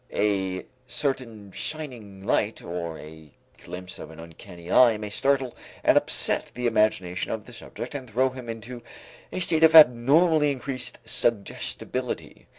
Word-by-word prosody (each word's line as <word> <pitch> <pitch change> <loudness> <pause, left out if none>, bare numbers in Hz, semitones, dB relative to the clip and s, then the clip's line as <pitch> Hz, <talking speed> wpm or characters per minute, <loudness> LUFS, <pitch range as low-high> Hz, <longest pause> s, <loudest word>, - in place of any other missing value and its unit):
A 95 -3 0 0.2
certain 115 -9 -3
shining 115 -10 -7
light - - 0
or 85 -2 -5
a 80 0 -12 0.3
glimpse 90 +1 -8
of 80 - -8
an 80 0 -12
uncanny 85 +1 -11
eye 120 -4 +6
may 105 -1 -6
startle 135 +1 0 0.3
and - - +5
upset - - +2
the 125 0 -3
imagination 105 -6 +1
of 110 -2 -4
the - - -13
subject - - -8
and 130 -4 -6
throw 130 +4 +1
him 125 -2 -9
into 115 +2 -7 0.5
a - - -3
state 165 -2 +1
of 160 0 +7
abnormally 150 +3 +6
increased 130 -1 -5
suggestibility. 120 +3 -2
115 Hz, 145 wpm, -26 LUFS, 95-130 Hz, 0.5 s, of